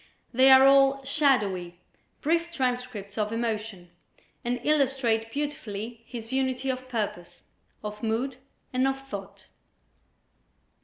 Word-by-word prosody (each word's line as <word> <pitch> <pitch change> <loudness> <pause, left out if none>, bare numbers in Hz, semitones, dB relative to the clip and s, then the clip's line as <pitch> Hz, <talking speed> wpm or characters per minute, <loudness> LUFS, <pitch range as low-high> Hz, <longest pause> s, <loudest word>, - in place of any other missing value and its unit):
They 260 +2 +6
are 265 0 +9
all 275 0 +5
shadowy, 210 - +1 0.4
brief 335 +2 +1
transcripts 250 -8 -3
of 210 0 0
emotion, 220 -6 -3 0.5
and 245 +1 -1
illustrate 265 -6 +1
beautifully 235 -6 -4
his 230 0 -7
unity 265 0 0
of 255 0 -7
purpose, 210 -7 -4 0.4
of 210 0 -6
mood 235 +4 -1 0.4
and 255 +1 +2
of 270 0 -1
thought. 200 -6 -9
245 Hz, 110 wpm, -27 LUFS, 215-270 Hz, 0.5 s, are